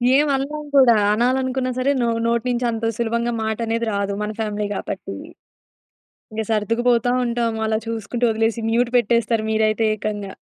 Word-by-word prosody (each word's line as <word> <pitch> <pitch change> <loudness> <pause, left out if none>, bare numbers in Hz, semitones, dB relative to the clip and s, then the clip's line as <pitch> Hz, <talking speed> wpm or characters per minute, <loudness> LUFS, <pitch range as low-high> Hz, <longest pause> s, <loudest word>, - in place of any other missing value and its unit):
ఏం 295 +1 +4
అనలేం 295 +3 -3
కూడా 245 -4 +7 0.2
అనాలనుకున్నా 255 +2 0
సరే 275 +2 +2
నో 235 - +1 0.2
నోట్నీంచి 240 +1 0
అంత 225 0 -3
సులభంగా 235 0 0
మాట 220 -1 -1
అనేది 230 +1 0
రాదు. 200 0 -1
మన 210 - -3
ఫ్యామిలీ 210 -1 -2
కాబట్టి. 180 - -5 1.2
ఇంకా 220 0 -2
సర్దుకు 225 +3 0
పోతా 240 +1 +2
ఉంటాం. 235 -1 -1
అలా 220 0 +1
చూసుకుంటూ 230 +2 -3
వదిలేసి 225 +1 0
మ్యూట్ 240 +1 +2
పెట్టేస్తారు 230 -1 +1
మీరైతే 220 0 +2
ఏకంగా. 205 -2 -4
230 Hz, 150 wpm, -21 LUFS, 220-245 Hz, 1.2 s, కూడా